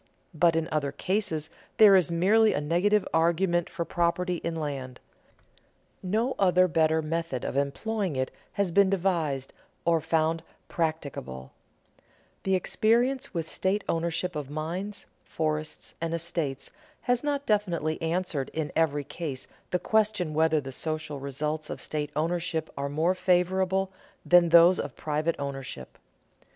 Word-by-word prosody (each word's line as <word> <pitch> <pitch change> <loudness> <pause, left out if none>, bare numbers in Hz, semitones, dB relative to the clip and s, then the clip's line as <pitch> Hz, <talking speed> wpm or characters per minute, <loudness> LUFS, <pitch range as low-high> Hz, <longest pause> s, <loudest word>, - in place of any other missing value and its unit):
But 165 +1 +3
in 165 0 0
other 145 -3 0
cases 175 -3 -2 0.3
there 210 -3 +8
is 180 -5 +4
merely 205 +6 +4
a - - 0
negative 180 +7 +2
argument 170 +1 +2
for 170 0 -4
property 175 +1 0
in 170 0 -4
land: 135 -5 -4 1.0
no 220 +7 0
other 185 -1 +4
better 160 -1 +2
method 165 -4 -3
of - - -3
employing 180 +6 -1
it 130 0 -1 0.2
has 200 -3 0
been 200 +2 +5
devised 170 -8 0 0.3
and 165 -2 +2
found 160 0 +1 0.3
practicable 140 - -3 0.9
The 190 0 +1
experience 235 +6 +1
with 165 -1 -2
state 195 +4 0
ownership 170 +1 -1
of 145 -3 -4
mines, 170 +7 -4 0.2
forests, 155 -1 -3
and 165 0 -1
estates 165 -5 -3 0.3
has 245 0 +1
not 285 -1 -1
definitely 175 -7 0
answered 165 -4 -1
in 155 -3 -2
every 145 -3 +1
case 140 -2 -6 0.2
the 180 - +1
question 210 -5 +1
whether 160 0 +3
the 135 -2 -7
social 155 0 -4
results 150 +3 -3
of - - -5
state 150 -1 -3
ownership 165 0 -1
are 140 0 -3
more 160 +5 +1
favorable 185 +1 +1 0.3
than 175 -1 +6
those 170 +2 +7
of 140 -3 -4
private 155 +2 -1
ownership. 135 - -6
165 Hz, 140 wpm, -27 LUFS, 155-185 Hz, 1.0 s, there